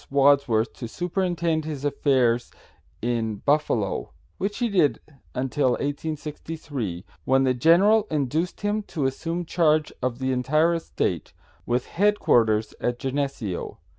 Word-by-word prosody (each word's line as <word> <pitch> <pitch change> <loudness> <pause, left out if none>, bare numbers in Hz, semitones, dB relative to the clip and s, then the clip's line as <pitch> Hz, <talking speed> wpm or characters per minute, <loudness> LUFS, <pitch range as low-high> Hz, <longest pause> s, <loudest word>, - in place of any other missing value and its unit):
Wadsworth 140 -5 +3
to 120 - -5
superintend 170 - -1
his 150 -2 -5
affairs 130 -4 +2 0.5
in 115 -2 0
Buffalo, 125 -5 0 0.3
which 205 +2 -2
he 240 - +1
did 180 -9 +2 0.4
until 130 0 +1
1863, 145 - -4 0.2
when 135 +1 +3
the 130 -1 +3
general 195 - +4
induced 155 +4 -1
him 205 +1 0
to 160 -8 -3
assume 165 +6 -2
charge 155 -2 +2
of 125 -1 -1
the 130 0 -1
entire 155 +7 +2
estate, 165 -1 -2 0.3
with 120 +1 0
headquarters 115 - +2
at 120 0 0
Geneseo. 135 -8 -3
140 Hz, 120 wpm, -25 LUFS, 125-165 Hz, 0.5 s, general